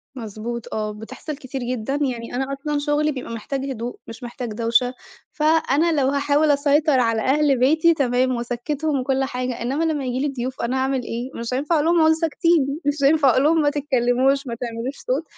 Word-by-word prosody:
مضبوط، 230 0 -6
آه، 215 -1 -2
بتحصل 260 +8 -7
كتير 270 -1 -6
جدًا. 245 +1 -2
يعني 245 -4 -2
أنا 265 +1 -1
أصلًا 290 +1 -2
شغلي 295 +1 +1
بيبقى 255 -4 -6
محتاج 265 +4 -4
هدوء، 240 0 -5
مش 230 +2 -10
محتاج 240 0 -5
دَوشة. 235 +3 +1 0.4
فأنا 315 0 +2
لو 260 - +2
هاحاول 285 +2 +2
أسيطر 285 0 +3
على 230 -2 +1
أهل 280 0 +2
بيتي، 315 +6 +4
تمام، 255 -3 +1
وأسَكّتهم 270 +5 -2
وكل 265 +1 0
حاجة. 250 -2 -3
إنّما 270 +7 -1
لمّا 305 -4 -1
ييجي 250 0 -2
لي 275 - -4
ضيوف، 255 0 -4
أنا 250 +3 -1
أعمل 265 -1 0
إيه؟ 235 +2 -4
مش 235 +1 -4
هينفع 285 +6 0
أقول 300 0 +2
لهُم 340 0 +3
اقعدوا 320 0 +5
ساكتين، 320 -3 +1
مش 290 0 +1
هينفع 285 0 +5
أقولهم 300 +6 +3
ما 290 - +3
تتكلموش، 270 -1 +1
ما 235 - -3
تعملوش 235 +3 -5
صوت. 265 +5 0
265 Hz, 185 wpm, -22 LUFS, 245-295 Hz, 0.4 s, اقعدوا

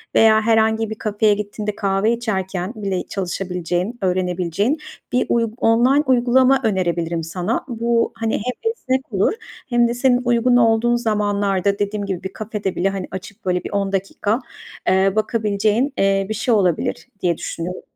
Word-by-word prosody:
veya 220 -1 +6
herhangi 220 0 +2
bir 220 - -4
kafeye 210 0 +1
gittiğinde, 210 0 -4
kahve 200 +3 +1
içerken 190 -3 -3
bile 195 -4 -2
çalışabileceğin, 180 +2 -3
öğrenebileceğin 185 - 0 0.3
bir 250 - +2
uyg 230 -2 +1
online 250 +6 +3
uygulama 255 +1 +4
önerebilirim 170 -5 0
sana. 180 +7 -2
Bu, 235 -1 0
hani, 225 -1 -2
hem 250 - -2
esnek 260 - -3
olur 195 - +2 0.4
hem 240 -1 +3
de 235 - -1
senin 245 0 +2
uygun 245 +1 +3
olduğun 230 0 +3
zamanlarda, 205 -3 0
dediğim 205 0 -1
gibi, 190 -2 -4
bir 190 - -5
kafede 210 -3 -4
bile, 195 +2 +1
hani, 195 -2 -4
açıp 195 +3 -9
böyle 180 -1 0
bir - - -6
10 200 -1 -1
dakika, 200 +4 -1 0.5
eee, 190 +1 +3
bakabileceğin, 215 +4 +1
eee, 195 0 +2
bir - - -1
şey 235 +3 0
olabilir 180 -4 0
diye 170 -2 +1
düşünüyorum. 175 +2 -5
210 Hz, 155 wpm, -20 LUFS, 190-235 Hz, 0.5 s, veya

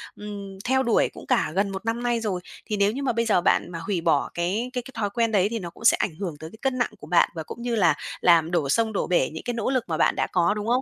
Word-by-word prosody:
ừm, 200 -2 -8
theo 265 +1 +2
đuổi 235 -3 +2
cũng - - -11
cả 155 - +2
gần 200 +1 +2
1 195 +3 -6
năm 230 +1 -1
nay 240 -1 +1
rồi. 200 -5 -2 0.3
Thì 210 - 0
nếu 200 0 +3
như 275 +5 -4
mà 255 -3 +1
bây 230 0 0
giờ 210 -5 +3
bạn 175 - +2
mà 170 - -5
hủy 175 +1 -2
bỏ 160 -4 +2
cái 195 +8 -1
cái 250 - -1
cái 265 - -11
thói 215 -3 -1
quen 230 +2 0
đấy 195 -2 +3
thì 230 - -3
nó 175 -4 -6
cũng 225 - -11
sẽ - - +6
ảnh 165 - -2
hưởng 180 -6 -3
tới 160 +1 -8
cái - - -12
cân 265 -1 0
nặng 240 - 0
của 150 - -11
bạn, 175 +1 +4
và 160 - -4
cũng 235 - -9
như 240 -1 -1
là 170 -8 +4 0.3
làm 170 -2 +4
đổ 160 -6 0
sông 220 +7 +2
đổ - - -1
bể 175 -7 +2
những 160 - -7
cái 245 - -2
nỗ 230 -1 -1
lực 260 -3 +1
mà 160 - -1
bạn - - +3
đã - - 0
có, 175 0 +3
đúng 210 0 -4
không? 250 +2 +2
205 Hz, 315 wpm, -25 LUFS, 175-235 Hz, 0.3 s, sẽ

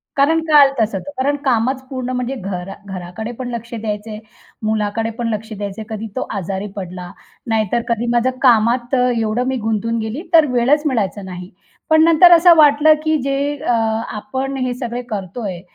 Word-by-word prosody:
कारण 300 +3 +3
काळ 295 -3 +6
तसंच 220 -1 +1
आहे. 190 - -3 0.2
तर - - -1
कारण 285 +1 +1
कामच 255 +1 +1
पूर्ण 255 -2 -4
म्हणजे 250 +2 -2
घरा 190 -2 -5
घराकडे 190 +4 -6
पण 250 -1 -4
लक्ष 235 +1 -8
द्यायचंय, 215 -1 -5 0.4
मुलाकडे 215 +1 -1
पण 235 - -1
लक्ष 220 +2 -6
द्यायचं 205 0 -6
आहे. 215 - -7
कधी 220 +1 -6
तो - - -3
आजारी 195 +2 -4
पडला, 180 -2 -7 0.4
नाहीतर 225 +1 0
कधी 235 0 -1
माझं 240 +2 +2
कामात 240 +1 +3
एवढं 240 -2 +1
मी 265 - 0
गुंतून 225 0 -1
गेली 220 - -4
तर 320 -2 +7
वेळच 250 +5 +3
मिळायचा 205 - -1
नाही. 180 -1 -8 0.4
पण 315 0 +5
नंतर 335 +2 +6
असं 340 0 +7
वाटलं, 300 0 +6
की 315 0 +2
जे 275 +2 -1
अ, 245 - +1 0.4
आपण 260 +6 -4
हे 250 - -1
सगळे 245 -1 -4
करतोय, 195 -2 -5
235 Hz, 175 wpm, -18 LUFS, 210-270 Hz, 0.4 s, तर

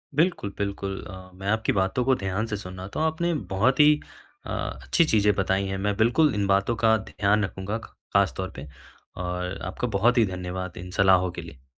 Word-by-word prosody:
बिल्कुल, 160 - +1
बिल्कुल 100 -1 -3
अ, 95 0 -10
मैं 95 +2 -8
आपकी 110 +1 +1
बातों 95 +6 +1
को 130 - +4
ध्यान 100 +1 -2
से 105 -2 -3
सुना 95 -1 -8
तो - - -3
आपने 160 +2 0 0.2
बहुत 125 +9 +2
ही 150 0 +8 0.5
अ, - - -8
अच्छी 170 - 0
चीज़ें 105 -6 +3
बताई 95 0 +1
हैं, 95 - -3
मैं 100 +1 -1
बिल्कुल 125 +6 +3
इन 100 -1 0
बातों 100 +4 +2
का 110 0 +5
ध्यान 105 +1 0
रखूँगा 95 +3 -4
ख 115 - -10 0.3
खास 100 -1 +3
तौर 95 0 -3
पे। 75 +3 -8 0.6
और 90 +1 -3
आपका 95 +6 -3
बहुत 120 +4 +3
ही 115 - +5
धन्यवाद 90 -1 -5
इन 90 0 -8
सलाहों 95 -2 +5
के 85 - -7
लिए। 75 -6 -13
100 Hz, 200 wpm, -25 LUFS, 95-110 Hz, 0.6 s, ही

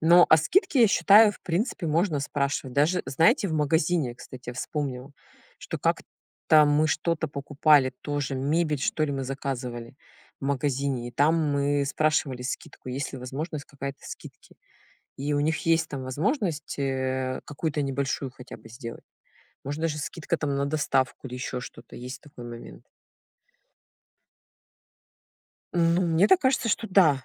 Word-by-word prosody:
Но 170 +2 +7
о 160 - +8
скидке, 265 - +3
я - - +8
считаю, 205 +2 +6
в - - -16
принципе 180 0 -2
можно 160 -1 +1
спрашивать. 140 -2 -2
Даже, 155 +6 +2
знаете, 200 - +3
в - - -3
магазине, 155 -2 +1
кстати, 125 0 -9
я - - -7
вспомнила, 130 0 -4 0.5
что - - -6
как-то 155 -1 +1
мы 150 +2 +3
что-то 160 +2 0
покупали, 140 -1 +3
тоже 145 -2 -2
мебель, 150 +2 0
что 155 - 0
ли, 145 - -2
мы 135 -1 -3
заказывали 125 -3 -5 0.4
в - - -6
магазине, 135 -2 -1
и - - -8
там 150 +6 +3 0.2
мы 140 0 +1
спрашивали 140 -4 0
скидку, 130 - -6
есть 135 +2 -3
ли 135 - -6
возможность 145 +4 -5
какая-то 140 -1 -7
скидки. - - -11 0.6
И 145 +2 -2
у 145 - +1
них 155 +1 +1
есть 165 -1 +3
там 135 -2 -5
возможность, 155 - -2
э, 130 -1 -1
какую-то 150 0 -2
небольшую 135 -1 -2
хотя 125 0 -11
бы 115 +1 -15
сделать. 115 0 -9 0.6
Можно 145 +4 -4
даже 155 -2 0
скидка 165 +2 -3
там 140 -2 -1
на 140 0 0
доставку 140 -3 0
или 125 - -7
ещё 125 0 -4
что-то, 115 -1 -11
есть 125 +1 -8
такой 140 -5 -12
момент. 115 - -10 2.9
Ну, 170 +1 +3
мне 170 +3 +3
так 380 - +6
кажется, 260 -5 +1
что 220 +1 0
да, 155 -9 +4
145 Hz, 150 wpm, -26 LUFS, 130-160 Hz, 2.9 s, о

